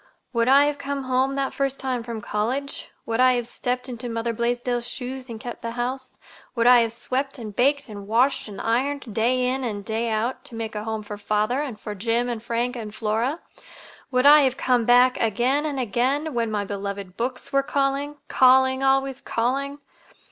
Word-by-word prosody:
"Would 230 0 +2
I 275 +2 +7
have 290 -1 -1
come 280 0 -3
home 260 +1 +1
that 275 -1 -1
first 275 -1 -1
time 255 -2 -2
from 230 -1 -6
college? 245 +8 -3 0.2
Would 225 +1 -2
I 255 0 +6
have 240 -1 -1
stepped 250 +2 -3
into 245 -1 -5
Mother 230 0 -2
Blaisdell's 240 +1 -1
shoes 255 0 -6
and 225 -1 -6
kept 240 +1 -7
the 230 0 -4
house? 255 +2 -3 0.4
Would 230 -1 +1
I 245 0 +8
have 230 -1 +1
swept 265 +4 -3
and 215 -4 -8
baked 280 +3 +2
and 205 -3 -9
washed 245 +5 +2
and 205 -2 -8
ironed, 260 +1 -1
day 250 +4 +2
in 260 +1 -1
and 205 -5 -4
day 225 +1 -1
out, 225 +4 -1
to 235 - -10
make 225 -1 -4
a 210 0 -4
home 220 -1 -3
for 205 0 -7
father 215 +6 0
and 255 -8 -5
for 210 - -6
Jim 230 +4 0
and 235 -2 -3
Frank 235 +2 -1
and 215 -3 -7
Flora? 230 +8 -1 0.7
Would 255 -1 +1
I 295 +1 +9
have 265 -1 +1
come 250 -4 +2
back 250 +2 +5
again 245 +7 +1
and 280 -3 -3
again, 260 +6 0
when 230 -2 0
my 205 -1 -1
beloved 200 -1 -5
books 250 +4 -4
were 275 - +4
calling, 280 +1 -1
calling, 260 +1 +5
always 270 0 +1
calling? 275 +5 -1
245 Hz, 200 wpm, -24 LUFS, 225-270 Hz, 0.7 s, I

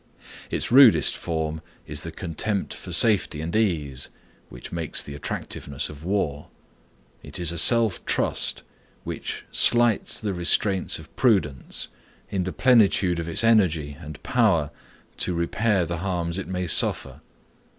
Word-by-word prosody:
Its - - -3
rudest 130 -3 +6
form 80 -1 -4 0.2
is 75 0 -3
the 85 - -6
contempt 95 +5 -3
for 90 - -10
safety 90 -3 +2
and 80 +4 -4
ease, 75 -11 -1 0.4
which - - -11
makes 85 -3 -2
the 70 - -9
attractiveness 70 -1 -4
of 75 0 -11
war. 85 -6 -2 0.7
It - - -7
is 85 -2 +1
a 85 - -5
self 115 -3 +3
trust - - 0 0.4
which - - -6
slights 120 -2 +3
the 105 -3 -3
restraints 95 +2 0
of - - -14
prudence, 95 - 0 0.4
in 95 -2 -1
the 95 - -3
plenitude 100 -8 +3
of 85 0 -4
its 85 - +3
energy 85 -10 +2
and 75 -1 -10
power 100 - +1 0.5
to 90 - -1
repair 95 +3 0
the 85 +1 -4
harms 85 -1 -3
it 95 - -6
may 90 -1 -3
suffer. 80 - +2
90 Hz, 140 wpm, -24 LUFS, 80-105 Hz, 0.7 s, rudest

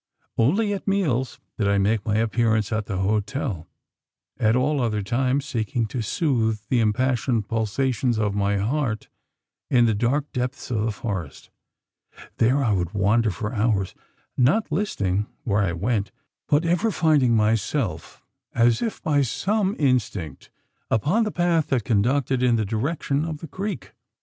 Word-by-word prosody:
Only 200 - +2
at 200 - -6
meals 150 -11 0 0.2
did 105 - +1
I 100 0 +3
make 100 +2 +1
my 105 - +1
appearance 110 -1 +1
at 110 -2 -1
the 100 - -3
hotel 105 - -1 0.7
at 110 +1 +3
all 140 +3 +1
other 105 -4 0
times, 130 +5 0
seeking 115 -3 -1
to 120 - -3
soothe 110 -3 0
the 125 - +3
impassioned 115 0 +1
pulsations 115 +2 0
of 105 -2 0
my 100 0 +1
heart 115 +1 -1 0.6
in 120 -2 +4
the 115 - +2
dark 125 +7 0
depths 125 0 -4
of 110 -3 0
the 110 +1 0
forest. 100 - -6 0.9
There 130 +5 +3
I 115 - +2
would 90 +1 -2
wander 105 +3 +3
for 105 +5 -4
hours, 105 -4 0 0.4
not 150 - +2
listing 105 - -1 0.2
where 105 -2 +1
I 90 -4 0
went; 100 +2 -1 0.4
but 150 +3 +2
ever 180 +7 +2
finding 150 - +3
myself, 110 - -1 0.3
as 120 -1 +3
if 225 - -3
by 145 -3 +2
some 195 - 0
instinct, 105 - -1 0.4
upon 170 - +2
the 215 - -2
path 175 -4 +1
that 125 -5 0
conducted 125 +4 +1
in 125 -2 +3
the 110 -2 0
direction 140 - -1
of 160 -2 -4
the 165 - -9
creek! 200 +7 -5
120 Hz, 155 wpm, -24 LUFS, 105-140 Hz, 0.9 s, in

